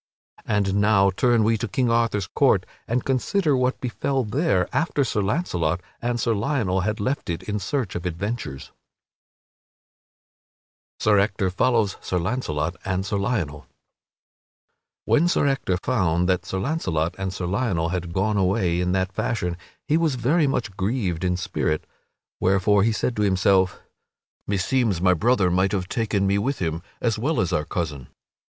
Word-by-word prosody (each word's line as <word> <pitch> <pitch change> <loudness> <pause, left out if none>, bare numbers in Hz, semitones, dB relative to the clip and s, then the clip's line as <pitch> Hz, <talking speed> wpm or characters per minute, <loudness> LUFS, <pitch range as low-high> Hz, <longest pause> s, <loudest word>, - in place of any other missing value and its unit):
And 100 -2 +1
now 100 -2 +4
turn 120 +3 +2
we 110 0 +2
to 120 - -2
King 125 -1 0
Arthur's 115 -4 +1
court - - +2 0.2
and 120 +2 -1
consider 145 +4 +1
what 130 0 0
befell 130 +2 -1
there 110 - +1
after 155 -3 +1
Sir 110 -4 -1
Launcelot 95 - 0 0.2
and 120 0 -1
Sir 115 0 +1
Lionel 105 -4 0
had 105 +3 -2
left 130 +3 -2
it 85 - -3
in 105 0 -3
search 110 +1 -2
of 90 - -4
adventures. 85 - -4 2.3
[Sidenote: - - -15
Sir 105 -2 +4
Ector 100 -1 +1
follows 110 +1 +1
Sir 90 - -2
Launcelot 85 -4 -2
and 95 0 -1
Sir 100 +1 -1
Lionel] 90 -9 -2 1.4
When 170 - +3
Sir 175 - +2
Ector 135 -10 0
found 90 -6 +1
that 90 0 0
Sir 95 - -2
Launcelot 95 - -1
and 95 -1 -2
Sir 95 -1 -4
Lionel 90 -4 0
had 90 -1 -3
gone 100 +4 0
away 90 -2 +1
in 90 0 0
that 95 0 0
fashion 90 -5 -1 0.3
he 155 - +3
was 160 -5 +1
very 145 +6 +2
much 115 -7 -2
grieved 95 -5 -1
in 90 -1 +1
spirit; 75 -3 -2 0.5
wherefore 100 +2 +3
he 115 +3 +3
said 115 +2 -1
to - - +1
himself, 95 -2 +2 0.7
"Meseems 100 0 +1
my 90 +1 +4
brother 95 0 +2
might 95 +3 +2
have 95 -3 -1
taken 105 -2 0
me 100 +1 +2
with 135 +7 -1
him 80 -1 -2 0.2
as 115 -3 0
well 150 +7 0
as 90 - 0
our 75 - 0
cousin." 75 -8 -4
100 Hz, 160 wpm, -24 LUFS, 90-120 Hz, 2.3 s, now